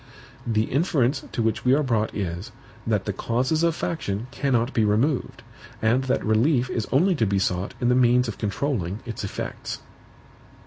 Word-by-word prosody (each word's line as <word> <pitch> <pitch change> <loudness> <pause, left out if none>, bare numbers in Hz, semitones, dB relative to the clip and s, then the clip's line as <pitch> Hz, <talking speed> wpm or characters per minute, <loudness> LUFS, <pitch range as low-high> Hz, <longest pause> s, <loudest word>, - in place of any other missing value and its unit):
The 110 -2 +2
inference 135 - +1
to 115 - -1
which 110 0 0
we 125 +1 +5
are 150 - +2
brought 115 -5 0
is, 95 +3 -4 0.4
that 105 -4 +1
the 100 - -2
CAUSES 130 +10 0
of 170 -1 +2
faction 110 -12 -3
cannot 130 -2 0
be 115 - +2
removed, 115 +7 0 0.4
and 120 +4 +2
that 130 - 0
relief 120 +4 +2
is 115 - -2
only 180 +8 +4
to 115 -10 +1
be 100 0 +1
sought 90 0 -1
in 120 - +1
the - - +5
means 125 0 +4
of 115 - -6
controlling 105 - -2
its 115 -3 -5
EFFECTS. 100 - -5
120 Hz, 175 wpm, -24 LUFS, 105-135 Hz, 0.4 s, we